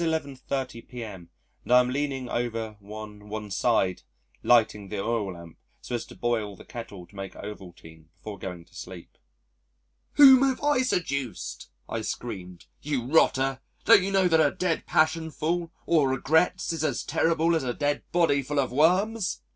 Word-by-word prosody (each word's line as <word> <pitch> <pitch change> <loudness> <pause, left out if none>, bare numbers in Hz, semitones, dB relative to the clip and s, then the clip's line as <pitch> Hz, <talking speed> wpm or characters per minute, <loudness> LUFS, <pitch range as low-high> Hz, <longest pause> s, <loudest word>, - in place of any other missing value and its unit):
30 130 -4 -2
p.m. 105 -9 -9 0.3
and - - -7
I 125 - +8
am 125 0 +1
leaning 135 -2 -2
over 115 -3 -3
one 105 0 -10
one 105 -1 -6
side 95 -4 +1 0.4
lighting 110 -4 +3
the 105 - -4
oil 105 -2 -1
lamp 85 -1 -12 0.2
so - - -8
as 120 - -2
to - - -12
boil 110 -4 -1
the - - -14
kettle 105 -6 -8
to 100 - -22
make 95 -1 -7
Ovaltine 85 -6 -10
before 105 -2 -9
going 90 -3 -7
to 90 - -27
sleep. 90 -1 -10 1.0
"Whom 265 -3 +9
have 270 0 +1
I 290 -3 +3
seduced?" 130 - -3 0.2
I - - -3
screamed. 90 -1 -6 0.2
"You 140 -5 -2
rotter, 135 -2 +3 0.3
don't - - +8
you 190 - -1
know 190 -2 +4
that 160 -2 +4
a - - +4
dead 180 -3 -2
passion 160 +1 +2
full 165 +2 -2 0.2
of 155 -5 +4
regrets 160 +7 +1
is 160 -2 -3
as 155 - -1
terrible 165 +1 +2
as 160 - 0
a 125 - -1
dead 145 +3 -1
body 165 -5 +3
full 145 +2 -4
of 130 -3 0
worms? 185 - +2
125 Hz, 170 wpm, -27 LUFS, 105-160 Hz, 1.0 s, Whom